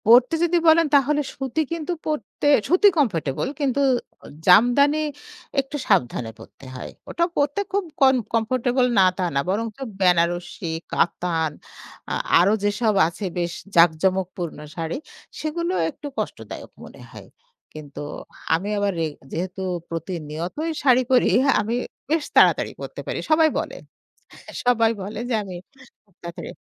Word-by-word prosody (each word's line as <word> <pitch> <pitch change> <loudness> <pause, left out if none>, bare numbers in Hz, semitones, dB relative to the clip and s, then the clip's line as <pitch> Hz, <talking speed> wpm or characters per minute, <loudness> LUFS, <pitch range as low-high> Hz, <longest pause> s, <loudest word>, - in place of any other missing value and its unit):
পড়তে 245 +6 +6
যদি 345 0 +3
বলেন 325 +1 +6
তাহলে 290 +2 +3
সুতি 270 +3 -2
কিন্তু 330 0 -3
পড়তে 300 -2 -3 0.2
সুতি 365 +7 +5
কমফোর্টেবল 170 - 0
কিন্তু 280 -1 +1 0.6
জামদানি 245 +10 +5 0.6
একটু 270 +2 -3
সাবধানে 125 - +1
পড়তে - - -14
হয় 125 - -7 0.2
ওটা 340 - +1
পড়তে 290 +4 0
খুব 400 +1 0 0.2
কন 265 -1 +6 0.2
কমফোর্টেবল 245 +2 +1
না 190 - +7
তা 185 - 0
না, - - +3
বরঞ্চ 215 +3 -2 0.2
বেনারসী, 175 -1 +1 0.2
কাতান 165 -2 0 0.6
আ - - 0 0.3
আরও 190 +5 +4
যেসব 210 +2 +1
আছে 170 +4 -6
বেশ 175 -1 -1 0.2
জাঁকজমকপূর্ণ 175 +1 +2 0.2
শাড়ি 165 -1 -3 0.4
সেগুলো 340 +3 -2 0.2
একটু 290 - -9
কষ্টদায়ক - - -6
মনে - - -13
হয়। - - -12 0.5
কিন্তু 145 -2 -9 0.5
আমি 180 +6 0
আবার 205 0 +1
রেগ 155 -2 -2 0.2
যেহেতু 185 +3 -4 0.3
প্রতিনিয়তই 165 - -4
শাড়ি 255 -2 +5
পরি 250 -1 +4 0.3
আমি 225 +3 -2 0.3
বেশ 320 0 +1
তাড়াতাড়ি - - +5
পরতে - - -7
পারি - - -3
সবাই 315 0 +5
বলে, - - -5 0.9
সবাই 230 -2 +3
বলে 205 +3 -6
যে - - -1
আমি 190 -2 -8 0.5
খুব 200 -4 -34
তাড়াতাড়ি 170 0 -7
210 Hz, 135 wpm, -23 LUFS, 175-280 Hz, 0.9 s, না